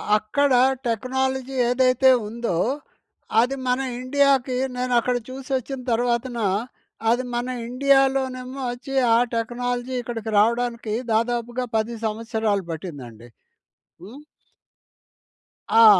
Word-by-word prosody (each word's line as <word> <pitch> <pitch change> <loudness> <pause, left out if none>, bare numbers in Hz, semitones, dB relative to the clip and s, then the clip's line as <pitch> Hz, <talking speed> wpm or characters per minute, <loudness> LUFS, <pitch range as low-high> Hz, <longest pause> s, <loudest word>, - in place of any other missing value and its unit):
అక్కడ 275 +7 +1 0.4
టెక్నాలజీ 265 +3 -1 0.2
ఏదైతే 255 +1 +4 0.2
ఉందో 230 -6 -2 0.8
అది 250 +3 0
మన 250 +1 +2 0.2
ఇండియాకి 265 -1 +2 0.2
నేను 250 0 -1
అక్కడ 250 +1 0
చూసొచ్చిన 265 0 -4
తర్వాతన 240 +1 0 0.7
అది 250 +2 +1
మన 240 +1 -1 0.2
ఇండియాలోనేమో 265 0 +1
వచ్చి 270 +3 -7 0.2
ఆ, - - +5 0.2
టెక్నాలజీ 245 +2 -2
ఇక్కడికి 225 -2 -5
రావడానికి 235 0 +1 0.2
దాదాపుగా 240 +2 0
10 225 +2 -1
సంవత్సరాలు 220 -2 -1
పట్టిందండి. 130 - -8 0.8
హ్మ్. 225 +9 -10 1.6
ఆ! - - +9
245 Hz, 95 wpm, -23 LUFS, 230-260 Hz, 1.6 s, ఆ